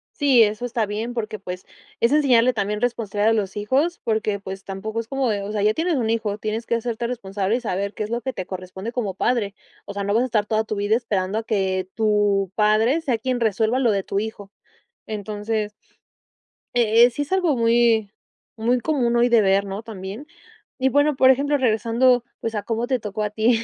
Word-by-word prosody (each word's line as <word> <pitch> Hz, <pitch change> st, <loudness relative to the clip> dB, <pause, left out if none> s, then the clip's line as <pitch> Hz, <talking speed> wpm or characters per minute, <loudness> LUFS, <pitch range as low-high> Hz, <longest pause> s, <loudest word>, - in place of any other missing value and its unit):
Sí 270 Hz, -5 st, +5 dB
eso 215 Hz, +3 st, -1 dB
está 235 Hz, -2 st, -1 dB
bien 215 Hz, +4 st, -4 dB
porque 215 Hz, -3 st, -4 dB
pues 180 Hz, -1 st, -7 dB, 0.3 s
es 235 Hz, -, +3 dB
enseñarle 255 Hz, -5 st, +4 dB
también 210 Hz, -1 st, -2 dB
responsabilidad 220 Hz, -3 st, 0 dB
a -, -, +3 dB
los 200 Hz, -4 st, -1 dB
hijos 275 Hz, +12 st, 0 dB
porque 215 Hz, -2 st, 0 dB
pues 195 Hz, 0 st, -8 dB
tampoco 215 Hz, +3 st, -5 dB
es 230 Hz, -, -5 dB
como 270 Hz, 0 st, -1 dB
de 205 Hz, -2 st, -1 dB
o 200 Hz, +1 st, -5 dB
sea, 210 Hz, -1 st, -1 dB
ya 215 Hz, +1 st, +4 dB
tienes 330 Hz, +4 st, 0 dB
un 235 Hz, -5 st, 0 dB
hijo 220 Hz, -3 st, -1 dB
tienes 215 Hz, +2 st, -3 dB
que 235 Hz, -, 0 dB
hacerte 235 Hz, 0 st, -2 dB
responsable 205 Hz, -3 st, -2 dB
y 250 Hz, -, -2 dB
saber 200 Hz, -2 st, -2 dB
qué -, -, -4 dB
es 210 Hz, -, -5 dB
lo 235 Hz, +1 st, -2 dB
que 260 Hz, +1 st, -3 dB
te 185 Hz, -5 st, -5 dB
corresponde 185 Hz, +3 st, -6 dB
como 230 Hz, -6 st, -2 dB
padre, 205 Hz, 0 st, 0 dB, 0.3 s
o 200 Hz, -, -7 dB
sea, 200 Hz, 0 st, -3 dB
no 200 Hz, +1 st, 0 dB
vas 230 Hz, +3 st, +3 dB
a -, -, +1 dB
estar 220 Hz, -5 st, 0 dB
toda 220 Hz, +1 st, 0 dB
tu 215 Hz, -, -3 dB
vida 205 Hz, +2 st, +1 dB
esperando 210 Hz, -4 st, -1 dB
a -, -, -5 dB
que 190 Hz, -4 st, -1 dB
tu 205 Hz, -3 st, +2 dB
padre, 220 Hz, +8 st, +3 dB
sea 265 Hz, -7 st, 0 dB
quien 250 Hz, +2 st, -2 dB
resuelva 225 Hz, +2 st, +1 dB
lo 245 Hz, -4 st, +3 dB
de 200 Hz, -2 st, 0 dB
tu 195 Hz, -, -2 dB
hijo. 205 Hz, -2 st, -6 dB, 0.6 s
Entonces, 210 Hz, 0 st, -3 dB, 1.0 s
eh, 230 Hz, -1 st, +5 dB
eh, 245 Hz, -, +5 dB
sí 245 Hz, +5 st, -3 dB
es 290 Hz, -, -7 dB
algo 360 Hz, -7 st, +2 dB
muy 230 Hz, -2 st, +3 dB, 0.5 s
muy 235 Hz, +3 st, +1 dB
común 245 Hz, -5 st, +1 dB
hoy 240 Hz, +1 st, +4 dB
de 235 Hz, -2 st, +5 dB
ver, 195 Hz, 0 st, +3 dB
¿no?, 200 Hz, +2 st, -5 dB
también. 210 Hz, +4 st, -8 dB, 0.5 s
Y 265 Hz, 0 st, +2 dB
bueno, 290 Hz, +1 st, +3 dB
por 260 Hz, 0 st, +6 dB
ejemplo, 285 Hz, +3 st, +2 dB
regresando 240 Hz, +1 st, +3 dB, 0.2 s
pues, 225 Hz, 0 st, -3 dB
a 205 Hz, -, -1 dB
cómo 230 Hz, +1 st, -1 dB
te 255 Hz, -2 st, 0 dB
tocó 210 Hz, 0 st, -4 dB
a 210 Hz, -, -2 dB
ti 225 Hz, +2 st, +2 dB
220 Hz, 220 wpm, -22 LUFS, 205-245 Hz, 1.0 s, por